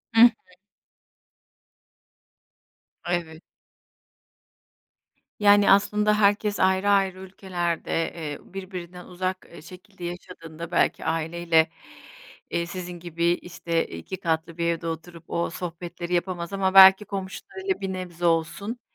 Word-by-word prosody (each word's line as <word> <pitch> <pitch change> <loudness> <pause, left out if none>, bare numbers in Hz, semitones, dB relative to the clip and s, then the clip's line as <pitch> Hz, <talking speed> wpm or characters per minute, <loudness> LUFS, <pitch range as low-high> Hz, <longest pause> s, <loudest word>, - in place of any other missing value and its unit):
Hı 225 - +7
hı. 240 - +10 2.8
Evet. 165 -2 -2 2.0
Yani, 205 -1 +6
aslında 210 +1 +4
herkes 205 0 +2
ayrı 190 +1 +3
ayrı 195 -2 +2
ülkelerde, 185 -3 -4 0.2
eee, 150 -4 -5 0.2
birbirinden 180 -2 -7
uzak, 185 +1 -4
e, - - -12
şekilde 185 +3 -13
yaşadığında, 170 -1 -8
belki - - +1
aileyle, 165 0 +1 0.8
iii, 170 0 -1
sizin 175 -1 -7
gibi 170 0 -3
işte 170 -1 -2
2 85 - -7
katlı 165 -2 -2
bir 170 - -1
evde 170 0 -1
oturup 165 +1 -7
o 170 - -1
sohbetleri 175 0 -6
yapamaz, 175 0 -2
ama 190 -1 0
belki 190 +1 +9
komşularıyla 205 - -5
bir 190 -1 -3
nebze 175 -2 -5
olsun, 170 +8 0
180 Hz, 110 wpm, -25 LUFS, 170-195 Hz, 2.8 s, hı